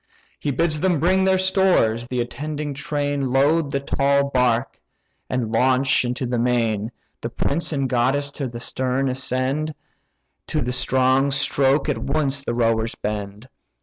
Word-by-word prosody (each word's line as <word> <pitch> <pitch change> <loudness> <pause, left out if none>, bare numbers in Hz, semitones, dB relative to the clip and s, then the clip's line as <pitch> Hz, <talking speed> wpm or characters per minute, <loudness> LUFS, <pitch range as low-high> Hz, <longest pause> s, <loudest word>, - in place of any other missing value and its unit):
He 150 - -2
bids 155 +2 +1
them 180 -5 +2
bring 190 +4 +3
their 190 0 +3
stores; 185 - +2
the 125 -1 -1
attending 145 +4 -4
train 145 -1 -2
Load 145 +3 +3
the 140 -1 -1
tall 140 0 +1
bark, 125 -1 +1 0.5
and 120 -4 -2
launch 130 +3 +3
into 125 +1 -2
the 120 -1 -1
main, 115 -3 0 0.3
The - - -3
prince 165 +5 -1
and 140 -3 0
goddess 135 +3 +1
to 140 -2 -4
the 120 -1 -7
stern 130 +2 -1
ascend; 130 +4 -1 0.7
To - - -1
the 125 - -1
strong 130 +2 +2
stroke 135 0 +2
at - - -1
once 140 -1 -1
the 120 - -2
rowers 115 -1 +1
bend. 105 +2 -5
135 Hz, 150 wpm, -22 LUFS, 125-145 Hz, 0.7 s, bring